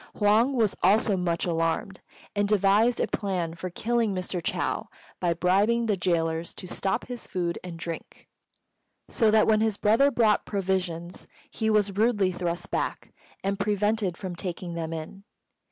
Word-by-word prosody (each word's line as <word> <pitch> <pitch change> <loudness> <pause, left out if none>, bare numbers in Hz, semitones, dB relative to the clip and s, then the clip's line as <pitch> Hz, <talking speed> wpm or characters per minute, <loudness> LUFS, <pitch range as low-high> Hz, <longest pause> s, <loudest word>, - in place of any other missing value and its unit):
Huang 220 +6 +3
was 220 -5 +2
also 205 +2 +4
much 175 -2 -1
alarmed, 165 +2 -1 0.3
and 205 0 +1
devised 210 +4 +3
a - - +2
plan 180 -5 -2
for 185 +2 -6
killing 225 +2 0
Mr. 180 -1 -3
Chou - - -1 0.3
by 170 -1 +1
bribing 200 +7 +2
the 215 -2 +1
gaolers 165 -2 -1
to - - -8
stop 190 +2 -1
his 245 -2 -7
food 175 -2 -2
and 175 -2 -7
drink; 165 0 -7 0.8
so 225 -4 +3
that 215 0 +5
when 215 -1 +3
his 220 -2 +1
brother 225 +7 +4
brought 225 -5 +3
provisions 185 -3 -3 0.2
he 220 -1 -1
was 205 -2 +2
rudely 210 -4 +3
thrust 175 0 -4
back - - -3 0.3
and 195 +1 -1
prevented 205 -2 0
from 185 -3 -5
taking 175 -1 -4
them 165 -1 -4
in. 165 +5 -7
195 Hz, 155 wpm, -26 LUFS, 175-215 Hz, 0.8 s, that